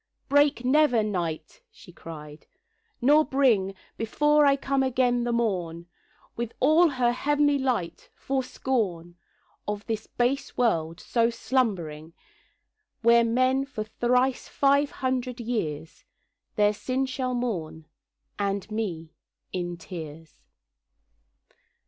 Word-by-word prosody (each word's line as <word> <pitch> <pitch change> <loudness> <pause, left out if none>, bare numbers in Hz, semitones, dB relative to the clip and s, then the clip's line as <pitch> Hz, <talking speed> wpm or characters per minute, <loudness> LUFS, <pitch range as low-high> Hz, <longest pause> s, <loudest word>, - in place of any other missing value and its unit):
'Break 285 -3 +3
never, 260 -4 +4
Night,' 180 - -4
she 255 - -16
cried, 150 -3 -11 0.5
'nor 295 +5 +5
bring 230 -10 +2 0.2
Before 295 +6 +3
I 275 - +5
come 275 0 0
again 250 -2 +1
the 240 - 0
morn 180 -8 -1 0.5
With 235 -1 -4
all 315 +5 +5
her 255 -4 +1
heav'nly 290 +2 +2
light, 225 -11 -2
for 270 0 -1
scorn 195 -10 -2 0.5
Of 205 -1 -4
this 220 -1 -4
base 250 +3 -1
world 165 -9 0
so 230 -1 +1
slumbering; 175 -11 -2 0.9
Where 235 0 +6
men 255 +3 +2
for 265 -6 -5
thrice 250 +4 0
five 280 +1 +2
hundred 255 -1 -3
years 165 -10 -4 0.5
Their 210 -1 +3
sin 255 +5 -2
shall 255 -1 -2
mourn, 175 -10 -3 0.5
and 200 +1 -2
me, 175 -8 -4 0.4
in 175 -2 -3
tears. 160 - -10
235 Hz, 110 wpm, -26 LUFS, 180-265 Hz, 0.9 s, Where